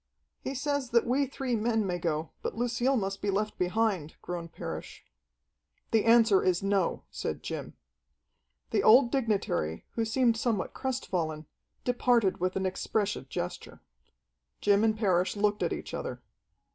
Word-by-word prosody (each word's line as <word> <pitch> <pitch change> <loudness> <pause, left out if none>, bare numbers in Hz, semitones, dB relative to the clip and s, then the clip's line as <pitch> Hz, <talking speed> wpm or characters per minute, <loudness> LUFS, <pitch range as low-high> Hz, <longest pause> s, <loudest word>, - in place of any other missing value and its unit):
"He 270 - -3
says 285 -1 -1
that 235 -1 +3
we 270 +3 +2
three 260 -2 -2
men 220 -1 +1
may 180 -2 -2
go, 160 -2 -2
but - - -3
Lucille 245 +3 +1
must 195 -2 -2
be 205 - -1
left 210 +2 -1
behind," 180 -4 0
groaned 170 -2 -5
Parrish. - - -7 0.9
"The 225 -1 +3
answer 225 -4 +6
is 185 0 +1
no," 195 -3 +1
said - - -4
Jim. - - -5 1.0
The - - +2
old 240 +2 +6
dignitary, 205 - -1
who 230 - -1
seemed 230 0 +2
somewhat 225 -4 -1
crestfallen, 170 -12 -2 0.4
departed 245 -5 +2
with 185 +1 -1
an 190 - -1
expressive 195 -4 -1
gesture. 90 - -5 0.8
Jim 205 +1 +3
and 220 -1 +2
Parrish 185 -4 +2
looked 205 0 +1
at - - +1
each - - -5
other. - - -4
210 Hz, 145 wpm, -29 LUFS, 185-240 Hz, 1.0 s, answer